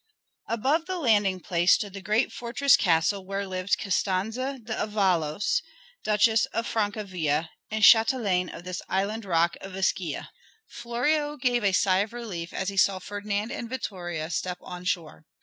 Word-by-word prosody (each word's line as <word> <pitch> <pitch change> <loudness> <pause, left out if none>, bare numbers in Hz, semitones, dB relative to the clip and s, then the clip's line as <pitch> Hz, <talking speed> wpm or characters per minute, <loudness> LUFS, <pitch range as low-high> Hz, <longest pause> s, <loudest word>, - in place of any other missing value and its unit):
Above 275 +9 +1
the 370 -1 -2
landing 205 - +2
place 175 0 +3
stood 205 -3 -4
the 195 - -7
great 215 +5 +1
fortress 245 +3 +3
castle 175 +3 +2
where 195 +1 -3
lived 185 +1 -1
Costanza 215 +8 -1
d' 230 -2 -11
Avalos, 200 - +1 0.4
Duchess 215 +1 +3
of 230 +1 -3
Francavilla, 185 -9 -1 0.2
and 215 0 -2
châtelaine 220 -6 +5
of - - -9
this 180 0 -5
island 200 +3 -1
rock 170 -2 +2
of 195 -1 -8
Ischia. 185 -4 -1 0.4
Florio 295 +6 -1
gave 245 -3 +1
a 200 - +3
sigh 185 0 +3
of 205 +3 -1
relief 195 -9 -6
as 190 - -2
he 200 - -7
saw 190 0 +4
Ferdinand 205 +3 -3
and 235 - -5
Vittoria 175 -10 -4
step 180 +2 -2
on 180 0 -8
shore. 165 -4 -3
200 Hz, 155 wpm, -26 LUFS, 185-230 Hz, 0.4 s, châtelaine